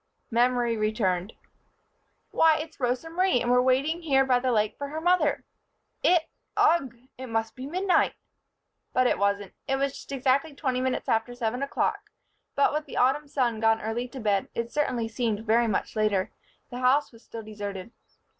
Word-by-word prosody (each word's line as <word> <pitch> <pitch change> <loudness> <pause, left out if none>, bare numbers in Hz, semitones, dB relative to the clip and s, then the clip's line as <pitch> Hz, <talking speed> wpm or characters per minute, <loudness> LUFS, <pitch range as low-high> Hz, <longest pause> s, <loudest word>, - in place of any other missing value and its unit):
Memory 240 0 +2
returned. 215 -3 0 1.0
"Why! 320 -1 +4
It's 315 +1 -7
Rosa 250 +4 -1
Marie, 355 -4 +2
and 240 +1 0
we're 250 0 +5
waiting 275 +7 +1
here 270 -5 +3
by 250 -2 +3
the 255 0 0
lake 215 -2 +1
for 285 - -5
her 305 +3 -5
mother. 340 -3 +2 0.6
It 350 -2 +4 0.3
ugh! 275 -8 +3 0.2
It 260 - -6
must 225 -1 -2
be 260 +1 -7
midnight!" 365 +4 +1 0.8
But 255 - +3
it - - +2
wasn't. 200 -1 0
It 270 - +1
was 275 0 -1
just - - -11
exactly 275 +3 +1
twenty 260 -3 -1
minutes 260 0 -1
after 225 +2 0
seven 245 +1 -2
o'clock 275 - -1 0.5
but, 280 - +3
with 300 0 -2
the - - -7
autumn 270 +4 +2
sun 245 -5 0
gone 225 0 +3
early 225 +3 -3
to 260 +2 -9
bed, 205 -4 0
it 235 0 -3
certainly 250 -6 0
seemed 225 -2 -2
very 230 +2 +3
much 215 - -2
later. 210 -3 +1 0.4
The 245 - -5
house 265 +3 +3
was 230 -1 -18
still 225 -1 -8
deserted. 205 -1 -7
250 Hz, 175 wpm, -27 LUFS, 225-280 Hz, 1.0 s, we're